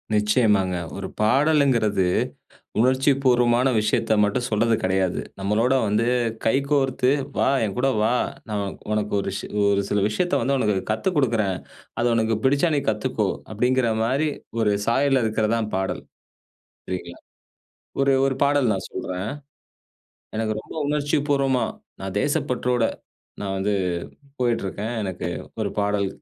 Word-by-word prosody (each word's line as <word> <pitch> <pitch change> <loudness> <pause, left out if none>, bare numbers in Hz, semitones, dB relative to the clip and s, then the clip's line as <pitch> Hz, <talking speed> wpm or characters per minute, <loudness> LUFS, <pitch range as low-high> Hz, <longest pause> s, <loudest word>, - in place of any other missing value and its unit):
நிச்சயமாங்க. 105 -3 +2 0.2
ஒரு 100 -1 -4
பாடலுங்குறது 125 -5 +3 0.7
உணர்ச்சிபூர்வமான 130 -1 +3
விஷயத்த 105 +1 +1
மட்டும் 105 +4 0
சொல்றது 115 +1 +2
கிடையாது. 95 -1 +1 0.2
நம்மளோட 105 +6 +1
வந்து 105 +3 +1 0.4
கைகோர்த்து 135 +1 +2 0.3
"வா, - - +3 0.2
என்கூட 125 +7 -1
வா, 110 - +2 0.4
நான் 100 -2 -2 0.2
உனக்கு 105 -1 -1
ஒரு 100 - -3 0.4
ஒரு 100 0 +2
சில 105 - +1
விஷயத்த 175 - -1
வந்து 135 +4 +1
உனக்கு 105 -5 +1 0.2
கத்துக்குடுக்குறேன். 115 - +1 0.4
அது 120 - +2
உனக்கு 115 0 +1
பிடிச்சா 145 +5 +3
நீ - - +3
கத்துக்கோ" - - -1 0.3
அப்டிங்குற 125 +2 +2
மாரி 135 +7 +1 0.3
ஒரு 105 -2 +2
சாயல்ல 135 +1 +3
இருக்கறது 110 0 0
தான் 110 -2 -2
பாடல். 95 0 -2 0.8
சரிங்களா. 90 -2 -6 0.8
ஒரு 135 0 +4
ஒரு 135 -1 +1
பாடல் 140 -4 +3
நான் 95 - -4
சொல்றேன். 95 +3 -4 1.1
எனக்கு 110 -1 0
ரொம்ப - - -12
உணர்ச்சி 145 0 0
பூர்வமா, 135 -3 +2 0.4
நான் 95 0 -5
தேசப்பற்றோட 125 -4 0 0.6
நான் 95 -1 -3
வந்து 100 +2 0 0.7
போயிட்ருக்கேன். 115 -2 -1
எனக்கு 95 -3 -4 0.3
ஒரு 105 -2 0
பாடல் 100 -1 +1
115 Hz, 120 wpm, -23 LUFS, 105-130 Hz, 1.1 s, ஒரு